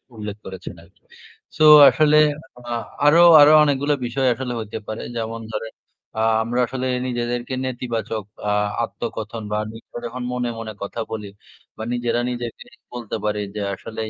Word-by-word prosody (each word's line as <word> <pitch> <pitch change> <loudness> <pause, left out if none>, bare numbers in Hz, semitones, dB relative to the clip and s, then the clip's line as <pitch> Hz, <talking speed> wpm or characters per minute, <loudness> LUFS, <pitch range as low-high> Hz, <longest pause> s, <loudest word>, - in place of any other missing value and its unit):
উল্লেখ 105 -2 -6
করেছেন 95 0 -8
আরকি। - - -25 0.6
So 155 - +2 0.3
আসলে 150 -1 +3 0.5
আ - - -5 0.3
আরো 155 +4 +6 0.2
আরো 145 +1 +8
অনেকগুলা 145 0 +1
বিষয় 130 +2 0
আসলে 125 +1 -5
হইতে 110 -1 -6
পারে। 110 - -5
যেমন 115 0 -4
ধরেন, 110 +1 -5 0.5
আ - - +1 0.2
আমরা 120 +2 -2
আসলে 130 +1 -4 0.2
নিজেদেরকে 120 0 -3
নেতিবাচক 120 -4 -3 0.3
আ - - +2 0.3
আত্মকথন 110 +1 -5
বা 105 - 0
নিত্ত 115 0 -14
যখন 125 +2 -5
মনে, 125 -1 -2
মনে 110 -1 -6
কথা 100 +3 -6
বলি 105 -2 -5 0.5
বা 110 - -5
নিজেরা 120 0 0
নিজেকে 120 - -6 0.3
বলতে 120 -3 -5
পারি 105 0 -1 0.2
যে 105 - -3
আসলেই 110 +2 -6
120 Hz, 155 wpm, -21 LUFS, 110-125 Hz, 0.6 s, আরো